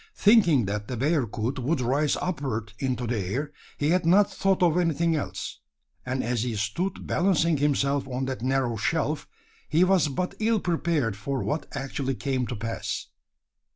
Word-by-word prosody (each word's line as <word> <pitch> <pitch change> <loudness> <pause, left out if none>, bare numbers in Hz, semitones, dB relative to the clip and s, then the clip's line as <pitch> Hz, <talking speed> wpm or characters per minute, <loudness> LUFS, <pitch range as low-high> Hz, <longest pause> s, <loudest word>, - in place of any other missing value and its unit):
Thinking 185 - +5
that 105 +1 -3
the 125 - -4
bearcoot 130 -3 0
would 140 +6 0
rise 135 +4 +1
upward 130 - -3
into 130 -2 -1
the 115 -1 -1
air, 125 +11 -3 0.2
he 145 - +1
had 180 0 +3
not 190 +5 +4
thought 195 -1 +1
of 170 -2 +4
anything 170 -1 +2
else; 150 - -4 0.4
and 130 0 -2
as 120 -1 0
he 120 -1 -2
stood 110 - -2
balancing 170 -3 +2
himself 140 -1 +1
on 130 0 -2
that 130 -2 -4
narrow 130 -2 0
shelf, 155 +5 -1 0.4
he 160 +3 +4
was 185 -4 +4
but 180 +6 -2
ill 225 0 +2
prepared 165 - 0
for 130 +6 -3
what 145 0 -2
actually 135 -1 -2
came 130 -2 -1
to 125 - -4
pass. 115 +1 -4
140 Hz, 165 wpm, -26 LUFS, 125-165 Hz, 0.4 s, Thinking